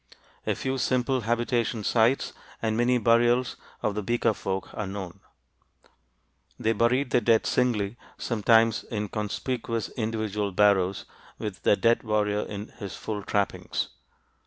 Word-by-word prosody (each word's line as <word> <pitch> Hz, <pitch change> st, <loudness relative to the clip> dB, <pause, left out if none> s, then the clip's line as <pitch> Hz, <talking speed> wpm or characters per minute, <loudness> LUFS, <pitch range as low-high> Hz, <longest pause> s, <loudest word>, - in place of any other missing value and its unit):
A -, -, +1 dB
few 130 Hz, 0 st, -2 dB
simple 130 Hz, +1 st, +1 dB
habitation 120 Hz, 0 st, 0 dB
sites 115 Hz, +5 st, +2 dB, 0.3 s
and 110 Hz, -1 st, 0 dB
many 120 Hz, +2 st, +3 dB
burials 120 Hz, +2 st, +3 dB, 0.3 s
of 105 Hz, -, +1 dB
the 105 Hz, -, -2 dB
Beaker 120 Hz, +1 st, +1 dB
folk 95 Hz, -1 st, -4 dB
are 105 Hz, -, -3 dB
known. 95 Hz, -2 st, -6 dB, 1.4 s
They 115 Hz, -, +1 dB
buried 125 Hz, +4 st, +2 dB
their 125 Hz, -, +4 dB
dead 115 Hz, 0 st, +3 dB
singly, 115 Hz, -3 st, +1 dB, 0.2 s
sometimes 115 Hz, -1 st, +3 dB
in 105 Hz, -2 st, -3 dB
conspicuous 115 Hz, +2 st, -3 dB
individual 110 Hz, -3 st, -2 dB
barrows 100 Hz, -1 st, +3 dB, 0.3 s
with 105 Hz, -3 st, -5 dB
the -, -, +4 dB
dead 115 Hz, +2 st, +3 dB
warrior 105 Hz, -2 st, 0 dB
in 105 Hz, +1 st, -6 dB
his 100 Hz, -3 st, -6 dB
full 105 Hz, -2 st, -4 dB
trappings. 100 Hz, 0 st, -1 dB
110 Hz, 135 wpm, -27 LUFS, 105-120 Hz, 1.4 s, their